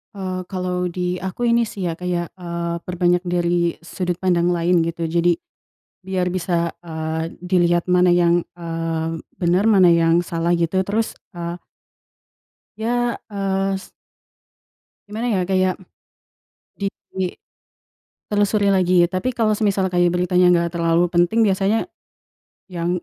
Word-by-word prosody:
Eee, 185 -2 -3
kalau 180 -1 -2
di 180 +1 -2
aku 190 +6 -2
ini 235 -1 +3
sih 200 -2 -6
ya - - -2
kayak, 175 -1 -2
eee, 170 -1 -3
perbanyak 175 0 +1
dari 175 -1 +1
sudut 180 0 -3
pandang 175 -2 +2
lain 175 0 +2
gitu 170 0 -3
jadi 170 +1 +2 0.7
biar 185 -1 -1
bisa, 175 -2 -1
eee, 160 0 -4
dilihat 175 -1 +2
mana 180 0 +5
yang, 175 0 +3
eee, 165 -1 -3 0.2
benar, 180 +2 +2
mana 190 -5 +6
yang 170 +1 +3
salah 165 0 -2
gitu. 170 +2 +1
Terus, 215 +4 -1 0.2
eee 170 0 -5 1.2
Ya, 240 +2 -1
es 195 -1 -2 1.2
gimana 225 +4 -2
ya 195 - +1
kayak 185 -1 +2 1.1
dituli 190 -2 -4 0.9
telusuri 205 0 +2
lagi. 180 -2 +4
Tapi 185 +8 -2
kalau 220 -3 +1
semisal 200 -3 +1
kayak 175 -1 +2
beritanya 180 0 +3
nggak 170 0 +1
terlalu 170 +1 +2
penting 175 +6 +2
biasanya, 205 - +2 0.8
ya 170 -1 -2
180 Hz, 125 wpm, -21 LUFS, 170-190 Hz, 1.2 s, mana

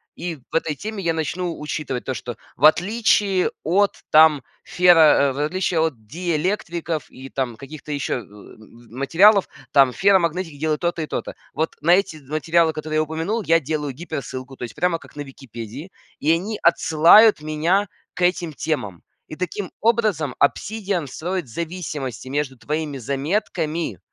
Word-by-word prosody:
И 175 -1 -4 0.2
в - - -7
этой 160 -2 0
теме 210 +4 -6
я 165 -1 +1
начну 165 +2 -3
учитывать 150 -4 -4
то, 130 - -2
что 120 -1 -7 0.2
в - - -11
отличие 195 +1 +3
от, 195 +5 +2 0.2
там, 155 -3 +6 0.2
феро 160 -6 +5
э, - - -6
в 135 - -6
отличие 165 -1 0
диэлектриков 165 - -3
и 130 +1 -11
там 130 -4 -3
каких-то 150 +3 -10
еще, 145 -1 -2
э, 120 - -5
материалов, 125 - +1 0.2
там, 135 -3 +5
ферромагнетики 180 -4 +1
делают 155 +2 -1
то-то 170 -1 -1
и 155 - -3
то-то. - - -5 0.2
Вот 160 +1 -2
на 170 - +3
эти 190 -4 -1
материалы, 160 +3 +1
которые 155 0 -3
я 155 - +3
упомянул, 165 +9 -2
я 165 -2 +4
делаю 150 -1 -3
гиперссылку, 135 -4 -7
то - - -9
есть 120 - -7
прямо 170 +1 0
как - - -17
на - - -4
Википедии. 135 - -9 0.3
И 155 - +2
они 195 +6 -1
отсылают 170 +5 +6
меня 165 +7 +1 0.3
к 180 - -8
этим 175 -2 +1
темам. 125 - -3 0.2
И - - -8
таким 180 +2 -4
образом 215 - +1
"Обсидиан" 195 +1 0
строит 175 +1 -4
зависимости 150 -5 -5
между 140 -1 -2
твоими 150 +2 -3
заметками, 150 - -2
160 Hz, 155 wpm, -22 LUFS, 140-180 Hz, 0.3 s, там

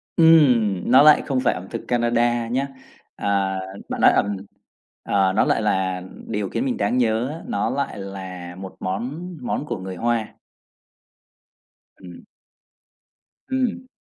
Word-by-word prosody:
Ừm, 125 - +4
nó 130 +2 +8
lại 150 -1 +7
không 135 -3 0
phải 125 - +2
ẩm 90 +1 -8
thực 115 - -5
Canada 120 -1 +1
nhá. 130 +4 -1 0.5
À, 100 -1 0 0.3
bạn - - -3
nói - - +7
ẩm 100 -1 +1 0.7
ờ, 95 -2 +2
nó - - +3
lại - - +1
là 95 -3 0 0.3
điều 105 -2 -2
khiến 255 - -2
mình 255 -3 -1
đáng 125 - 0
nhớ 115 0 +1
á, 160 +3 -7
nó 100 - -1
lại 140 -5 -2
là 95 -2 -7
một 95 0 -9
món 130 - -4
món 125 +3 -2
của - - -3
người 95 0 -6
Hoa. 115 +2 -1 1.7
Ừm. 90 -2 -12 1.3
Ừm. 255 -1 -1
115 Hz, 145 wpm, -22 LUFS, 95-135 Hz, 1.7 s, nó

